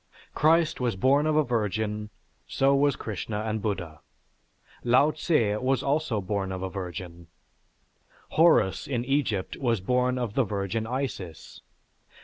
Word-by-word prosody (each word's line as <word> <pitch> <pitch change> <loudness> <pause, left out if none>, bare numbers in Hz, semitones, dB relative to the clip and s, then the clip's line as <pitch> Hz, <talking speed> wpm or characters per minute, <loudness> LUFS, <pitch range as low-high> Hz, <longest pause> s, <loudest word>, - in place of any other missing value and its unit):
Christ 165 0 +3
was 120 -5 0
born 140 +9 +3
of 155 - +1
a 155 - +4
virgin, 105 -3 -2 0.4
so 135 +1 +2
was 140 -1 +3
Krishna 105 0 -4
and 110 0 -2
Buddha. 85 -7 -4 0.8
Lao 130 +5 +4
Tsze 115 - +1
was 130 0 +1
also 140 -5 0
born 95 0 -2
of 95 0 -4
a 95 - -4
virgin. 90 -2 -7 1.0
Horus 105 - +3
in 125 -3 -2
Egypt 125 -8 -1
was 120 -5 0
born 125 +5 +1
of 120 -4 -3
the 135 - +2
Virgin 100 +1 -3
Isis. 115 - -5
115 Hz, 135 wpm, -27 LUFS, 100-135 Hz, 1.0 s, a